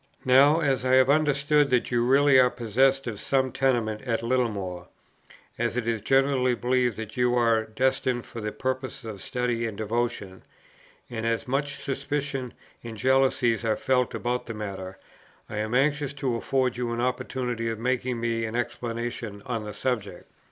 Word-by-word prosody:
"Now, 140 +5 +6
as 135 -4 +1
I 130 0 +2
have 130 +1 +5
understood 145 -1 +3
that 125 0 +1
you 120 -1 +2
really 135 +2 +5
are 125 -1 +6
possessed 130 +3 +1
of 110 -4 -5
some 130 +1 +1
tenements 120 -5 0
at 115 -1 0
Littlemore, 105 -8 -1 0.7
as 120 0 -1
it 125 - -1
is 115 -2 0
generally 135 +1 +2
believed 125 -1 +1
that 110 -1 -6
they 125 - -2
are 120 -2 +3
destined 125 +2 0
for 115 - -8
the 105 0 -3
purposes 130 -1 -4
of 105 -4 -7
study 125 -3 -1
and 105 -3 -7
devotion, 110 -3 -3 0.7
and 115 -2 -4
as 115 +1 -1
much 140 +2 -1
suspicion 140 -2 -3 0.3
and 115 -2 -7
jealousy 130 0 +3
are 110 -2 +1
felt 125 -2 +1
about 125 +1 -2
the 115 - -5
matter, 95 -3 -6 0.5
I - - -6
am 110 +3 -1
anxious 145 +1 +1
to 135 -3 -2
afford 125 +1 0
you 120 -1 -2
an 115 - -3
opportunity 125 -1 -2
of 115 - -3
making 125 +1 -1
me 115 -1 -1
an 110 +1 -5
explanation 120 -3 -4
on 115 -4 -3
the 105 - -6
subject. 105 -5 -3
125 Hz, 170 wpm, -26 LUFS, 115-130 Hz, 0.7 s, Now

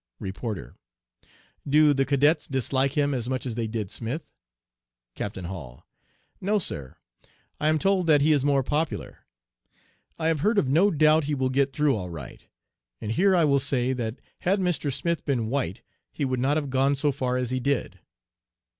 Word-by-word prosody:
"REPORTER 100 +2 -5 1.0
'Do 150 +1 +5
the 135 -1 +1
cadets 145 +3 +2
dislike 135 0 0
him 145 -1 +1
as 125 -2 -2
much 130 0 -2
as 125 - -3
they 115 0 -2
did 110 -3 -4
Smith?' 135 +7 -4 0.9
"CAPTAIN 95 - -5
HALL 80 -10 -8 0.6
'No, 205 +3 +1
Sir, 70 - -4 0.6
I 150 - +1
am 155 0 +3
told 190 0 +1
that 150 -3 +5
he 155 +2 +4
is 145 -3 +3
more 140 -1 +2
popular. 150 +4 -2 1.0
I 160 - -3
have 160 -2 +1
heard 210 +8 +1
of 145 - +3
no 165 +10 +4
doubt 155 -2 +4
he 150 0 -1
will 130 -1 0
get 135 +1 +2
through 145 0 +2
all 90 -4 -4
right. 85 -2 -9 0.6
And 110 - -4
here 190 - +3
I 170 -3 +4
will 140 -2 +3
say, 130 -2 0
that 115 -3 -3 0.2
had 195 +3 +1
Mr. 175 -6 0
Smith 170 +5 -1
been 120 -6 -1
white 130 -10 -2 0.3
he 145 - -2
would 130 -1 -1
not 140 +4 +2
have 145 -3 -3
gone 135 +2 +2
so 145 +1 +1
far 125 -2 -1
as 125 -1 -2
he 130 - 0
did.' 140 -1 -1
140 Hz, 180 wpm, -26 LUFS, 125-155 Hz, 1.0 s, Do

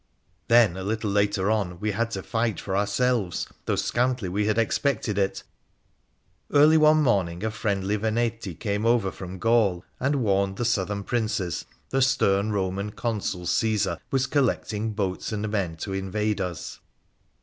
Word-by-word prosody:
Then, 115 -6 +5
a 95 - -5
little 105 +1 -2
later 100 0 +1
on, 95 -5 -1
we 105 +1 -1
had 115 +3 -1
to 95 -5 -5
fight 115 -5 -1
for 95 - -3
ourselves, 105 -1 0 0.2
though - - +1
scantly 120 -5 0
we 105 +3 0
had 110 0 +1
expected 115 -2 0
it. 95 -1 -1 1.1
Early 150 +2 +6
one 155 -1 +5
autumn 90 -5 +1
a 110 - 0
friendly 100 -1 -1
Veneti 110 -3 -1
came 105 -1 -1
over 115 -5 +2
from 95 -1 -8
Gaul 105 -4 +2
and 140 0 +1
warned 100 -1 +1
the 120 - -1
Southern 100 -3 0
Princes 105 -7 -2 0.3
the 135 - +1
stern 110 -6 +2
Eoman 100 +1 -2
Consul 100 -6 -2
Caesar 110 +3 +1
was 135 -1 +1
collecting 115 -6 0
boats 95 -2 -2
and 110 0 -2
men 95 -6 -2
to 95 +4 -5
invade 100 +2 -1
us. 90 -3 -5
105 Hz, 155 wpm, -25 LUFS, 95-115 Hz, 1.1 s, Early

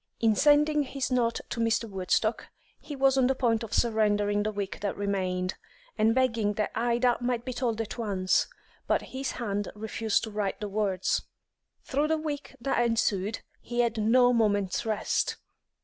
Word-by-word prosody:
In 225 -2 +3
sending 295 +3 +4
his 270 -1 -3
note 235 -2 +1
to - - -3
Mr. 230 0 +1
Woodstock, 200 +3 0 0.3
he 295 - -8
was 270 0 +3
on 250 - +4
the 265 - +1
point 235 -3 +1
of 225 -2 -6
surrendering 210 -3 +2
the 215 +1 -1
week 200 -2 -4
that 200 -1 -3
remained, 185 -2 -1 0.4
and 220 +2 +3
begging 230 -5 +1
that 210 +1 -1
Ida 240 +1 +2
might 245 -1 -1
be 255 - -3
told 235 -3 -1
at 225 +2 -6
once, 195 -4 +1 0.4
but - - +1
his 265 0 -4
hand 205 -4 -3
refused 220 0 -1
to 220 - -5
write 205 -2 -2
the 210 - -3
words. 195 -2 0 0.6
Through 290 +2 0
the 320 0 +1
week 295 -3 -5
that 240 0 +1
ensued 220 -3 0 0.2
he 240 0 -1
had 230 -2 0
no 245 +3 +4
moment's 205 -2 +1
rest. 215 -1 0
225 Hz, 170 wpm, -28 LUFS, 205-250 Hz, 0.6 s, sending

